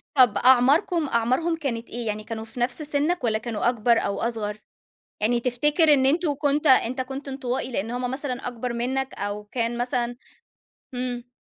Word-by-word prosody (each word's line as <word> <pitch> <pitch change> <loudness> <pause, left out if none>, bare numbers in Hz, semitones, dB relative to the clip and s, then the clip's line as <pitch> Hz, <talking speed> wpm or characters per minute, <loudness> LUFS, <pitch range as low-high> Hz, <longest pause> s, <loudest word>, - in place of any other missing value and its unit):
طَب 245 -6 +5
أعماركُم 275 - +4
أعمارهُم 255 +9 +1
كانت 245 -7 -4
إيه؟ 235 -1 -5
يعني 215 0 -3
كانوا 220 0 -6
في 225 +2 -9
نَفْس 245 +5 0
سِنَّك 300 +2 0
والَّا 220 -2 +1
كانوا 225 0 -1
أكبر 235 -1 +2
أو 200 - -1
أصغر؟ 215 -3 -2 0.6
يعني 235 +3 +2
تفتكر 295 +6 +3
إن 265 -1 +3
أنتوا 310 +1 +2
كنت 290 +1 0
أنت 260 -1 +4
كنت 270 +2 -5
انطوائي 260 -1 -3
لأن 225 0 -3
هُم 250 0 -2
مثلًا 265 -2 -3
أكبر 245 0 -4
منك 260 +3 -2
أو 205 +1 -4
كان 235 +2 -2
مثلًا، 245 -1 -1 0.8
إمم. 245 -1 -4
245 Hz, 170 wpm, -24 LUFS, 235-275 Hz, 0.8 s, طَب